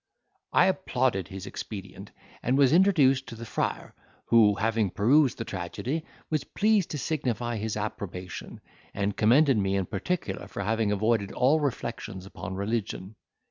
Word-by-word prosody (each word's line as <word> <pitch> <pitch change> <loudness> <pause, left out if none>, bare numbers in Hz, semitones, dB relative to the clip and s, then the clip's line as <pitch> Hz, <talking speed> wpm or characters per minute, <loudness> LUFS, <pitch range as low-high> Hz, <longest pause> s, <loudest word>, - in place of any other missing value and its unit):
I - - +5
applauded 130 - 0
his 95 -1 -8
expedient, 95 -3 -7 0.3
and 130 +3 +1
was 140 0 +5
introduced 150 -8 +4
to 115 - -8
the 115 +1 -8
friar, 110 - -3 0.3
who, 110 -3 +5
having 110 -1 +1
perused 130 - +3
the 115 - -4
tragedy, 110 - -4 0.3
was 155 -3 +1
pleased 210 +2 +1
to 150 - -3
signify 120 -6 -2
his 110 0 -3
approbation, 95 -4 -6 0.3
and 100 0 -1
commended 130 +3 +4
me 95 0 +1
in 95 -1 0
particular 170 - -3
for 100 - -5
having 110 +1 +1
avoided 105 0 +1
all 140 +5 +3
reflections 115 -9 -4
upon 95 -1 -7
religion. 100 -1 -3
115 Hz, 145 wpm, -27 LUFS, 100-135 Hz, 0.3 s, I